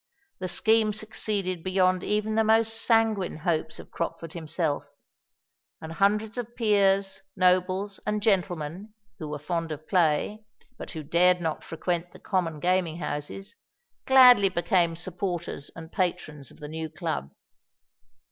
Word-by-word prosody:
The 185 Hz, -, -3 dB
scheme 220 Hz, +3 st, +2 dB
succeeded 205 Hz, -4 st, -3 dB
beyond 185 Hz, 0 st, +1 dB
even 210 Hz, +1 st, 0 dB
the 220 Hz, 0 st, +3 dB
most 225 Hz, +1 st, +3 dB
sanguine 225 Hz, -5 st, +1 dB
hopes 160 Hz, 0 st, -1 dB
of -, -, -12 dB
Crockford 165 Hz, -1 st, -4 dB
himself; 160 Hz, -2 st, -2 dB, 1.0 s
and 160 Hz, -, -8 dB
hundreds 210 Hz, +6 st, +1 dB
of 240 Hz, 0 st, -6 dB
peers, 200 Hz, -4 st, +2 dB
nobles, 185 Hz, +2 st, +1 dB
and 210 Hz, 0 st, -1 dB
gentlemen, 185 Hz, -1 st, -1 dB, 0.2 s
who 155 Hz, -, -5 dB
were 150 Hz, 0 st, -4 dB
fond 165 Hz, +2 st, -3 dB
of 155 Hz, +1 st, -7 dB
play, 180 Hz, +4 st, +1 dB, 0.3 s
but -, -, -9 dB
who 160 Hz, -4 st, -6 dB
dared 180 Hz, +4 st, +3 dB
not 160 Hz, -2 st, -3 dB
frequent 175 Hz, +1 st, -3 dB
the -, -, -13 dB
common 170 Hz, -6 st, -1 dB
gaming 175 Hz, -1 st, +1 dB
houses, 180 Hz, +7 st, -5 dB, 0.5 s
gladly 250 Hz, -6 st, +8 dB
became 170 Hz, -1 st, +1 dB
supporters 175 Hz, -3 st, -4 dB
and 165 Hz, 0 st, -10 dB
patrons 150 Hz, -7 st, -2 dB
of -, -, -17 dB
the 150 Hz, -, -7 dB
new 160 Hz, +1 st, -5 dB
Club. 145 Hz, -, -4 dB
180 Hz, 140 wpm, -27 LUFS, 165-210 Hz, 1.0 s, gladly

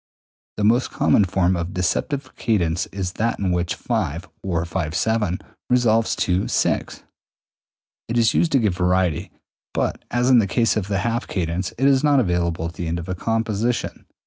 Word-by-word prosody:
The 105 Hz, -, -1 dB
most 120 Hz, +5 st, +3 dB
common 105 Hz, -, +3 dB
form 95 Hz, 0 st, +1 dB
of 85 Hz, +2 st, -4 dB
deceptive 130 Hz, +9 st, -1 dB
cadence 85 Hz, -7 st, 0 dB
is 95 Hz, -2 st, -4 dB
that 115 Hz, +1 st, +1 dB
in 95 Hz, -2 st, -1 dB
which 85 Hz, -1 st, -1 dB
V -, -, -5 dB, 0.5 s
(or 85 Hz, -3 st, -1 dB
V^7) 90 Hz, +4 st, -1 dB, 0.3 s
resolves 115 Hz, -3 st, +3 dB
to 90 Hz, +1 st, 0 dB
VI. -, -, +1 dB, 1.2 s
It 115 Hz, -, -1 dB
is 115 Hz, -2 st, +4 dB
used 170 Hz, -, +2 dB
to -, -, +6 dB
give 105 Hz, -6 st, +1 dB
variety, 90 Hz, -3 st, +1 dB, 0.5 s
but -, -, -1 dB
as 120 Hz, +1 st, +1 dB
in 125 Hz, -, +7 dB
the 105 Hz, -, +2 dB
case 115 Hz, +3 st, +2 dB
of 105 Hz, -3 st, -1 dB
the 100 Hz, -1 st, 0 dB
half 120 Hz, +1 st, -1 dB
cadence, 90 Hz, 0 st, -2 dB
is 135 Hz, +1 st, +3 dB
not 145 Hz, -2 st, +4 dB
available 85 Hz, -6 st, 0 dB
at 85 Hz, -, -4 dB
the 85 Hz, 0 st, -5 dB
end 85 Hz, +1 st, -1 dB
of 85 Hz, -, -6 dB
a -, -, 0 dB
composition. 115 Hz, +3 st, -2 dB
95 Hz, 170 wpm, -22 LUFS, 90-115 Hz, 1.2 s, in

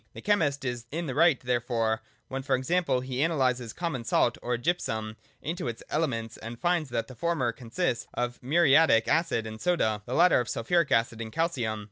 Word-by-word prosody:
The -, -, -9 dB
chemist 150 Hz, -10 st, +1 dB
is 120 Hz, -2 st, -4 dB
in 170 Hz, +5 st, -3 dB
the 135 Hz, -, -3 dB
right 160 Hz, -1 st, +4 dB
therefore 120 Hz, -2 st, 0 dB, 0.3 s
when, 135 Hz, 0 st, -4 dB
for 135 Hz, 0 st, +1 dB
example, 130 Hz, 0 st, +1 dB
he 130 Hz, 0 st, -3 dB
analyses 130 Hz, -7 st, +1 dB
common 160 Hz, -7 st, -3 dB
salt 120 Hz, +1 st, +2 dB
or 120 Hz, 0 st, -1 dB
gypsum 110 Hz, -7 st, -2 dB, 0.3 s
into 165 Hz, -4 st, -3 dB
its 115 Hz, -1 st, -5 dB
elements, 115 Hz, -8 st, -1 dB
and 115 Hz, +1 st, -8 dB
finds 175 Hz, -4 st, +1 dB
that 115 Hz, -, -1 dB
the 130 Hz, -, -10 dB
former 155 Hz, -4 st, 0 dB
consists 120 Hz, +4 st, -2 dB
of 120 Hz, 0 st, -3 dB
muriatic 145 Hz, -4 st, +4 dB
acid 160 Hz, -9 st, +1 dB
and 110 Hz, 0 st, -8 dB
soda, 110 Hz, -13 st, +1 dB
the 125 Hz, -, -2 dB
latter 175 Hz, -3 st, +5 dB
of 120 Hz, -, -3 dB
sulphuric 170 Hz, +7 st, +1 dB
acid 115 Hz, 0 st, +1 dB
and 110 Hz, -1 st, -6 dB
calcium. 125 Hz, -10 st, -1 dB
125 Hz, 185 wpm, -28 LUFS, 115-165 Hz, 0.3 s, latter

